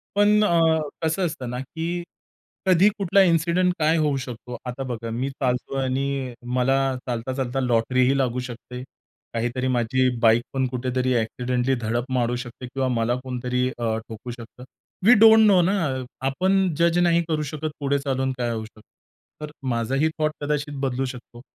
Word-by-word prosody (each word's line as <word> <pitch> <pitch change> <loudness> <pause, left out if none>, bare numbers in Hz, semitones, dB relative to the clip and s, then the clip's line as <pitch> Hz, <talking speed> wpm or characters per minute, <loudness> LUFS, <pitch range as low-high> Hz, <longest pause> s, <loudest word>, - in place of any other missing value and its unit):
पण 210 +1 +4
अ, 165 -4 +3 0.2
कसं 165 +4 +1
असतं 150 -7 -4
ना, 125 +1 -4
की 165 +5 -4 0.6
कधी 185 +2 +5
कुठला 195 0 +3
इंसिडेंट 175 +1 +2
काय 155 +2 +3
होऊ 150 -3 +1
शकतो. 125 -1 -7
आता 125 +2 -4
बघा, 115 -3 -5
मी 125 +4 -2
चालतोय 135 0 -2
आणि 135 0 -2 0.2
मला 130 +2 +2 0.3
चालता-चालता 130 +2 -2
लॉटरी 125 0 +1
ही 135 +1 +2
लागू 125 -2 0
शकते. 125 +1 -8 0.5
काहीतरी 120 +3 -1
माझी 125 +1 +2
बाईकपण 120 +3 +2
कुठेतरी 130 0 -1
एक्सिडेंटली 125 +3 -1
धडक 120 0 -2
मारू 120 -1 +1
शकते 120 +1 -10
किंवा 130 +1 -2
मला 120 0 0
कुणीतरी 125 0 -1
अ, 115 -2 -1
ठोकू 115 +2 -8
शकतं. 120 +1 -11 0.4
वी 235 - +8
डोंट 220 0 +8
नो 190 -3 +6
ना. 165 -8 0 0.2
आपण 185 +5 +1
जज 170 0 +3
नाही 170 -1 +3
करू 155 -2 -1
शकत. 155 +1 -3
पुढे 140 0 0
चालून 135 -1 -1
काय 120 -1 -1
होऊ 110 -1 -4
शकतं? 110 -1 -17 0.6
तर 150 -1 -6 0.2
माझाही 130 +6 +1
थॉट 155 -1 +2
कदाचित 145 0 -2
बदलू 135 -1 -1
शकतो. 120 -2 -9
130 Hz, 160 wpm, -24 LUFS, 125-155 Hz, 0.6 s, वी